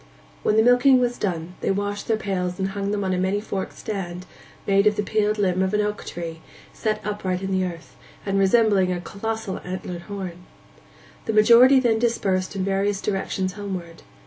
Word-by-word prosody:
When 215 - +2
the 220 - +6
milking 245 +2 +5
was 245 -1 0
done 175 -3 -3
they - - -1
washed 205 +1 -2
their 225 - +2
pails 180 -3 -2
and 190 0 -1
hung 200 0 -3
them 205 0 -1
on 190 -1 0
a 180 - 0
many 190 +2 +1
forked 200 -2 -5
stand 185 -4 -5 0.4
made 200 +1 +3
of 210 - +3
the 210 - -1
peeled 215 0 0
limb 185 -3 +1
of 190 +2 +1
an 210 - +2
oak 210 0 -3
tree, 165 -2 -6 0.3
set 215 -1 -1
upright 190 -3 -2
in 195 - -3
the 190 -1 +1
earth, 170 -2 -8 0.3
and 195 -1 0
resembling 195 -2 +3
a 180 - -2
colossal 210 +2 -4
antlered 180 -1 -5
horn. 185 -3 -6 0.8
The 220 - -1
majority 235 +5 +7
then 230 -3 +2
dispersed 200 -5 0
in 190 - -1
various 195 +1 0
directions 190 -2 -2
homeward. 185 -5 -6
195 Hz, 190 wpm, -23 LUFS, 185-215 Hz, 0.8 s, majority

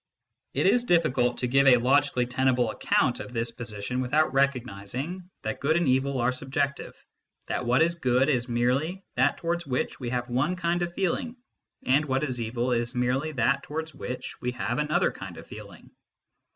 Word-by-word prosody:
It - - +1
is 245 - +4
difficult 135 - +2
to 125 - -1
give 135 +2 +4
a 125 -2 +8
logically 130 0 +2
tenable 125 -2 +1
account - - +1
of - - -8
this 115 0 -1
position 115 +1 -4
without 145 +3 +2
recognising 135 - -2
that 110 0 -3
good 155 +4 +2
and 170 -3 +1
evil 130 +1 +2
are 120 +1 +2
sub 130 +1 -8
jective, 140 +1 -1 0.5
that 125 - -3
what 125 +6 +4
is 170 +1 +2
good 130 -5 +2
is 125 -4 0
merely 130 +10 0
that 130 +3 +2
towards 170 0 -2
which 125 -1 -2
we 125 -3 -4
have 125 0 -2
one 130 +9 0
kind 175 0 0
of 175 0 -1
feeling, 195 +6 -1 0.5
and 140 +4 +3
what 135 0 0
is 130 -5 -2
evil 120 +2 -1
is 120 +1 -1
merely 125 +5 0
that 135 +2 +2
towards 160 +1 -5
which 125 -2 -6
we 125 0 -2
have 125 +2 -2
another 150 0 +2
kind - - -9
of - - -10
feeling. - - -12
130 Hz, 185 wpm, -27 LUFS, 125-150 Hz, 0.5 s, a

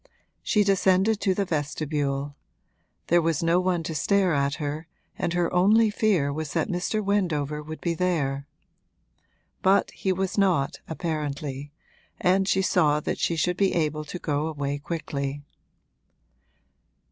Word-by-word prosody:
She 210 -2 +2
descended 195 +2 +3
to 190 -3 +2
the 200 - 0
vestibule; 145 -3 -2 0.7
there 175 +1 +4
was 165 -2 0
no 165 +2 +3
one 180 -2 0
to 160 - -4
stare 190 +3 +2
at 140 0 +1
her 150 +2 -4 0.3
and 170 - -2
her 175 -1 0
only 210 +5 +4
fear 190 -10 +1
was 155 -1 -4
that - - 0
Mr. 195 +4 -1
Wendover 155 -7 0
would 155 +1 -8
be 170 - 0
there. 150 -6 -1 1.1
But 190 +1 +3
he 190 - -2
was 190 +2 -1
not, 175 -9 +2
apparently, 145 -3 -4 0.5
and 190 +1 +2
she 190 -1 +2
saw 150 -5 +3
that - - -3
she 170 - +1
should 180 +2 0
be 195 -2 +2
able 155 -2 0
to 165 - -6
go 150 -2 -1
away 145 -2 -3
quickly. 145 -3 -4
165 Hz, 145 wpm, -26 LUFS, 145-185 Hz, 1.1 s, there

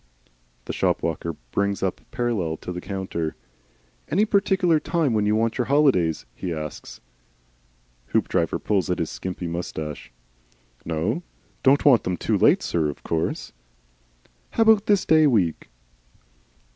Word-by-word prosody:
The - - -4
shop - - 0
walker 85 0 -2 0.2
brings 100 -1 0
up 95 - -2
parallel 115 -10 -1
to - - -7
the 90 0 -5
counter. 95 -5 -4 0.7
"Any 200 +7 +3
particular 195 -5 +2
time 160 -6 0
when 105 -1 +1
you 105 - +3
want 115 +2 0
your 125 - +2
holidays?" 130 - +2
he 90 - -5
asks. 75 -2 -7 1.1
Hoopdriver - - 0
pulls 100 -4 0
at 90 - 0
his 80 - -2
skimpy 90 -1 -5
moustache. 80 -5 -5 0.7
"No 85 - -1 0.4
Don't 135 +2 +4
want 135 -6 +6
them 90 -1 -2
too - - 0
late, - - +4
sir, 80 -3 0
of 70 - -8
course." 80 0 -2 1.0
"How 225 - +4
about 220 -2 +4
this 205 -2 +3
day 155 -1 +5
week?" 95 - +1
100 Hz, 140 wpm, -24 LUFS, -, 1.1 s, want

